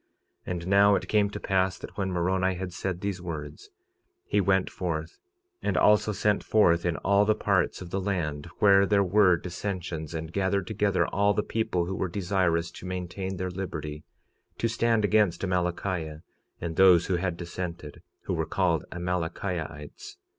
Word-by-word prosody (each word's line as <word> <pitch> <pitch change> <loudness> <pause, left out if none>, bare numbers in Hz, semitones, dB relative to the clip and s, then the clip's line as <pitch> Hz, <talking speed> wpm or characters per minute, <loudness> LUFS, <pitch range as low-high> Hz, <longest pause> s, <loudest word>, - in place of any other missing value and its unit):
46:28 - - -3
And 85 -1 -4
now 100 +1 +5
it - - -2
came 105 -1 +2
to 105 - -6
pass 95 -2 0
that - - -10
when 95 -2 -2
Moroni 95 +1 +1
had 90 0 -5
said 90 0 -3
these 100 -2 -3
words 75 -4 -7 0.6
he 105 - +1
went 95 -1 +2
forth, 85 -2 -4 0.4
and - - 0
also 105 0 +4
sent 105 +1 +1
forth 85 -5 +3
in 85 - -1
all 100 +1 +3
the 105 +1 +2
parts 95 -2 0
of 85 - -11
the 95 - -1
land 85 -6 -2
where 100 -1 +5
there 100 -1 +3
were 95 -1 +4
dissensions, 90 -3 -5
and 80 +1 -5
gathered 100 -1 0
together 105 -1 +1
all 100 0 +2
the 105 - +1
people 90 -6 -1
who 95 - -4
were 95 -1 -2
desirous 85 -3 0
to 90 - -9
maintain 95 +1 -4
their 90 +1 -3
liberty, 75 -5 -5 0.5
to 115 - 0
stand 115 -2 +1
against 105 -5 +2
Amalickiah 90 -3 -2 0.4
and 85 -1 -5
those 90 -3 +6
who 95 -2 0
had 90 -1 -2
dissented, 85 -3 -6 0.2
who - - -3
were - - -1
called 85 -5 +1
Amalickiahites. 85 -3 -4
95 Hz, 170 wpm, -27 LUFS, 85-100 Hz, 0.6 s, those